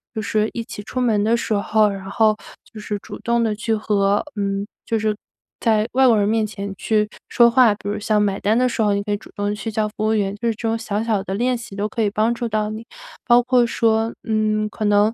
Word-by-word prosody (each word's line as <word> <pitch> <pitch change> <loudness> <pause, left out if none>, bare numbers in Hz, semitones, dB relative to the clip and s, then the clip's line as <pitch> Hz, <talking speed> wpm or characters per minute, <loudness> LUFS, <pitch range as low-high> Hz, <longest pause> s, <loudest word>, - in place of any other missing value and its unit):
就 220 - -2
是 215 +1 0
一 235 - -3
起 205 - -8
出 255 +4 -5
门 220 -5 +2
的 230 +2 +2
时 225 - -2
候， 215 +1 +3
然 195 -1 -5
后 215 +1 +3 0.4
就 215 - -8
是 210 0 -3
主 - - -10
动 235 0 +1
地 220 - +1
去 220 +2 -1
和 205 -1 +1
嗯， 200 0 -1 0.2
就 225 - +1
是 215 0 0 0.4
在 220 -1 +2
外 260 0 +4
国 225 -3 +5
人 205 - +2
面 220 0 +1
前 200 -1 -6
去 210 +1 +1 0.2
说 235 -1 +6
话， 235 -3 +5
比 205 - -10
如 205 - -2
像 210 0 +1
买 200 -2 0
单 215 +3 +2
的 255 0 +3
时 230 - -2
候 205 -1 +2
你 200 - -1
可 205 - -4
以 205 - +1
主 - - -16
动 205 0 -1
去 220 +2 -5
叫 215 0 0
服 210 - -22
务 220 - +2
员， 200 -1 0
就 235 - -2
是 225 - 0
这 225 0 -4
种 225 - +1
小 220 -2 -2
小 220 -4 0
的 190 0 -4
练 250 +3 +1
习 230 -4 -8
都 205 +1 -1
可 230 - -3
以 210 - +2
帮 215 +3 +1
助 235 0 -3
到 215 0 -1
你。 220 +1 -6 0.4
包 240 -1 +7
括 250 -1 +3
说， 225 0 +1
嗯， 215 -1 0
可 215 - -6
能， 205 +1 +3
215 Hz, 280 characters per minute, -21 LUFS, 205-225 Hz, 0.4 s, 包